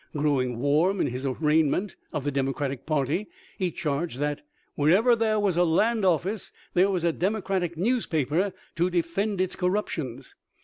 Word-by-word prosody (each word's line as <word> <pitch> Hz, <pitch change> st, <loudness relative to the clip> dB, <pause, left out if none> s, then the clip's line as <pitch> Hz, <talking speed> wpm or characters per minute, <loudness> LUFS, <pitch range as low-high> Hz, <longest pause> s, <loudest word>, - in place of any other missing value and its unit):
Growing 135 Hz, -5 st, +1 dB
warm 155 Hz, +9 st, +2 dB
in -, -, +2 dB
his 130 Hz, +2 st, -3 dB
arraignment 155 Hz, +7 st, +1 dB, 0.2 s
of 150 Hz, -3 st, -3 dB
the 145 Hz, -, -1 dB
Democratic 135 Hz, 0 st, -2 dB
party, 155 Hz, +5 st, 0 dB, 0.3 s
he 185 Hz, -2 st, +1 dB
charged 150 Hz, -2 st, -2 dB
that 145 Hz, +1 st, -2 dB, 0.2 s
" -, -, -41 dB
wher 145 Hz, +1 st, +2 dB
ever 225 Hz, +8 st, +5 dB
there 220 Hz, -2 st, +1 dB
was 195 Hz, -4 st, +1 dB
a 175 Hz, -, +5 dB
land 210 Hz, +7 st, +2 dB
office 185 Hz, +3 st, 0 dB, 0.2 s
there 185 Hz, +3 st, +4 dB
was 185 Hz, -4 st, -1 dB
a 170 Hz, -, +3 dB
Democratic 190 Hz, -3 st, -1 dB
newspaper 180 Hz, -, +1 dB, 0.2 s
to 175 Hz, +3 st, +2 dB
defend 180 Hz, +4 st, -1 dB
its 185 Hz, -1 st, 0 dB
corruptions." 165 Hz, -, -2 dB
170 Hz, 165 wpm, -26 LUFS, 145-195 Hz, 0.3 s, ever